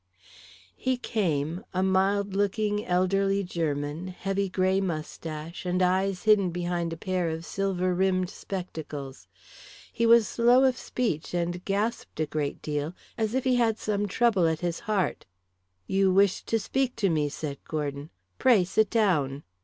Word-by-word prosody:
He 260 -1 -1
came, 170 - -1
a 185 - +2
mild 195 +1 +2
looking 205 +1 0
elderly 195 +2 +2
German, 155 -1 -2
heavy 195 +1 -2
grey 185 +1 +1
moustache, 160 -2 -5
and 180 0 0
eyes 185 +1 +1
hidden 210 -4 +4
behind 175 -1 -2
a 165 - -5
pair 180 -1 -1
of 160 +1 -5
silver 185 -1 -1
rimmed 185 0 +1
spectacles. 155 -7 -7 0.7
He 230 0 +1
was 230 -2 +6
slow 240 +4 +4
of 260 -2 +4
speech 215 -11 -2
and 175 +1 -2
gasped 205 -2 -2
a 155 - +2
great 150 -1 -3
deal 150 +3 -3 0.2
as 220 +1 -1
if 260 - +1
he 255 -1 +2
had 225 -2 +2
some 205 -1 -1
trouble 200 -4 +3
at 160 -1 -1
his 175 -1 -2
heart. 195 - 0 0.6
"You 195 - +2
wished 195 0 +3
to 225 - +2
speak 260 +3 -1
to 200 -5 +1
me," 150 -2 +1
said 145 -1 -5
Gordon. 145 -1 -3 0.3
"Pray 235 -8 +5
sit 195 +3 +1
down." 155 - +1
185 Hz, 155 wpm, -27 LUFS, 165-205 Hz, 0.7 s, was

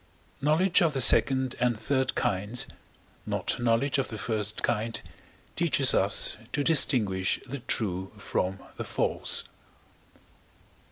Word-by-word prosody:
Knowledge 170 +7 +2
of 165 -3 +1
the 135 - -2
second 130 +1 +4
and 120 -2 0
third 130 +3 -1
kinds, 105 +5 -1 0.6
not - - -2
knowledge 120 +4 0
of 135 - -2
the 110 - -8
first 105 -1 -3
kind, 115 -1 -2 0.6
teaches - - +3
us - - +2 0.2
to 145 - -1
distinguish 110 - +4
the 135 +2 -7
true 95 -6 -2
from 95 +1 -3 0.2
the - - -5
false. - - -1
120 Hz, 120 wpm, -26 LUFS, 105-135 Hz, 0.6 s, second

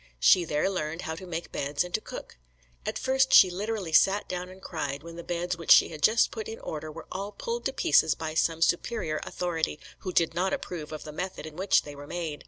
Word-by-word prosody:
She 175 - +6
there 150 +1 0
learned 165 -3 -3
how 160 - -3
to 185 +3 -9
make 170 -1 -5
beds 140 +3 -1
and 180 0 -9
to 215 - 0
cook. - - -9 0.5
At - - -1
first 265 0 +3
she 185 - +8
literally 200 -2 -3
sat 195 +5 +4
down 180 0 -4
and 185 +1 -12
cried 145 -6 -4
when 170 0 -9
the 170 - -7
beds 175 +1 -2
which 165 - -8
she - - +8
had 155 -2 -9
just 220 +8 +4
put 220 -2 -5
in 225 - -6
order 155 0 -5
were - - -9
all 200 +2 -4
pulled 475 - -4
to - - +1
pieces 160 - +3
by 160 -1 -4
some 165 0 +2
superior 170 -3 0
authority, 165 -4 -2 0.2
who 185 - -4
did 165 -2 +2
not 185 +3 0
approve 160 -4 -5
of 155 - -6
the 155 - -8
method 180 +1 -5
in 155 -1 -9
which 190 +3 +3
they 145 - -9
were 145 0 -10
made. 165 -3 -4
170 Hz, 235 wpm, -28 LUFS, 155-190 Hz, 0.5 s, she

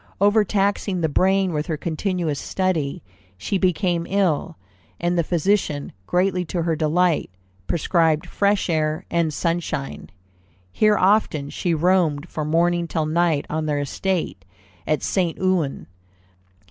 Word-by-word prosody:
Overtaxing 200 -2 +2
the 160 - +1
brain 190 +3 +2
with 150 0 -2
her 160 -3 -2
continuous 165 -1 -2
study, 175 -7 -1 0.3
she 190 - -2
became 180 -2 +1
ill, 185 - 0 0.4
and 175 +1 0
the 170 - +2
physician, 170 -3 0 0.2
greatly 180 0 +1
to 170 0 -2
her 165 -1 0
delight, 165 +2 +1 0.4
prescribed 165 -1 +1
fresh 200 +2 +1
air 155 +1 -1
and 170 -2 +1
sunshine. 165 -3 -3 0.6
Here 210 - +3
often 185 -7 +2
she 175 -2 -1
roamed 165 -2 +2
from 155 -1 -4
morning 170 +1 +2
till 160 -2 -1
night 160 -1 +1
on 155 0 -2
their 145 -1 0
estate 165 - -2 0.4
at 155 - 0
St. 175 -4 0
Ouen. 185 -7 0
170 Hz, 130 wpm, -22 LUFS, 155-185 Hz, 0.6 s, Here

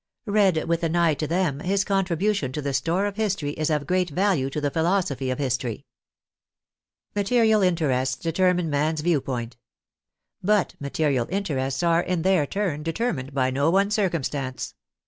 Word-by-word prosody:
Read 200 -6 +2
with 170 0 0
an 165 0 0
eye 170 -2 +3
to 150 +2 -3
them, 165 -4 0
his 190 +4 +1
contribution 195 -5 0
to 150 - -4
the 140 -1 -2
store 175 +7 +1
of 205 0 -4
history 195 -9 -1
is 155 +1 -2
of 150 -2 0
great 180 +2 +1
value 175 -5 +1
to 145 - -3
the 145 -1 -1
philosophy 160 -6 0
of 130 - -1
history. 125 -4 -2 1.3
Material 220 +1 +3
interests 140 -8 +1
determine 175 +4 +1
man's 150 +1 0
view 160 -3 +2
point. 120 -3 -5 0.8
But 205 0 +2
material 140 -3 0
interests 145 -7 -2
are, 170 0 +3
in 175 -2 -2
their 185 -6 +3
turn, 185 -6 -2
determined 160 - -3
by 130 -1 +2
no 140 +4 +2
one 195 +3 +2
circumstance. 150 -10 -2
165 Hz, 160 wpm, -24 LUFS, 140-190 Hz, 1.3 s, eye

